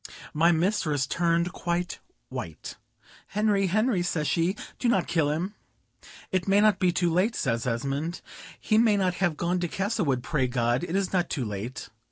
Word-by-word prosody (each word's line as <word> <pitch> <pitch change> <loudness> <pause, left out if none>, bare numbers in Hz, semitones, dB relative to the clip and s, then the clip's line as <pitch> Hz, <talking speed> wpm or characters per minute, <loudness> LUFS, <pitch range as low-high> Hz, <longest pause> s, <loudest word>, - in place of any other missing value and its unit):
My 165 +3 +4
mistress 160 -5 +1
turned 170 +3 +1
quite 175 +1 -2 0.3
white, - - -6 0.5
"Henry, 205 -2 +1
Henry," 215 +1 +2
says 160 -4 -1
she, 170 +6 +1 0.2
"do 245 - +1
not 190 -6 +2
kill 160 -4 +1
him." 170 +7 -2 0.8
"It 185 -1 0
may 195 +1 +4
not 210 -2 +4
be 180 -2 +3
too 175 -1 +1
late," 200 +6 +2
says 115 -2 -1
Esmond; 140 +8 -2 0.4
"he 215 - +2
may 220 -3 +4
not 185 -2 +1
have 175 -5 +1
gone 175 +2 0
to 175 - -1
Castlewood; 185 - -1
pray 135 -4 0
God, 120 +2 0
it 175 +1 -3
is 195 -1 0
not 180 -2 +1
too 130 -5 -2
late." 105 +5 -5
175 Hz, 175 wpm, -27 LUFS, 150-195 Hz, 0.8 s, My